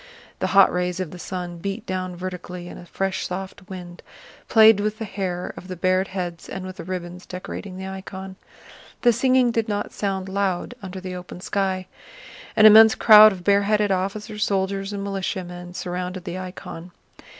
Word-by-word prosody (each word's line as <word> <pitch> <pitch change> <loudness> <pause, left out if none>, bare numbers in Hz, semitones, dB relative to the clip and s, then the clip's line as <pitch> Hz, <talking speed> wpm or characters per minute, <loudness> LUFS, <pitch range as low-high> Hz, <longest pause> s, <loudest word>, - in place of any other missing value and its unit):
The - - 0
hot 195 - +7
rays 180 0 -1
of 185 -4 -3
the 180 - -10
sun 175 -1 -5
beat 200 +5 -4
down 185 -1 -3
vertically 180 0 -6
and - - -9
a 175 - -12
fresh 195 +2 -2
soft 190 +1 -7
wind 175 -2 -9 0.5
played 220 -2 +7
with 215 +1 -1
the 225 - -4
hair 185 -3 -4
of 185 - -10
the 185 - -5
bared 185 +2 +1
heads 175 -3 -5
and 190 - -5
with 185 0 -8
the - - -6
ribbons 180 0 -6
decorating 185 +1 -7
the 190 - -6
icon. 190 0 -7 0.7
The 240 -2 +6
singing 255 +1 +3
did 225 -1 -1
not 205 -1 -2
sound 195 -2 -2
loud 195 +1 -1
under 190 -1 -7
the 185 0 -6
open 180 0 -8
sky. 190 0 -1 0.7
An 215 - +6
immense 220 +1 +9
crowd 215 -1 +9
of 185 -3 -7
bareheaded 205 +1 +3
officers, 205 +3 -2
soldiers, 195 0 -1
and 200 -1 -4
militiamen 180 -2 -4
surrounded 180 0 -4
the 180 0 -5
icon. 180 -2 -8
190 Hz, 175 wpm, -23 LUFS, 180-200 Hz, 0.7 s, immense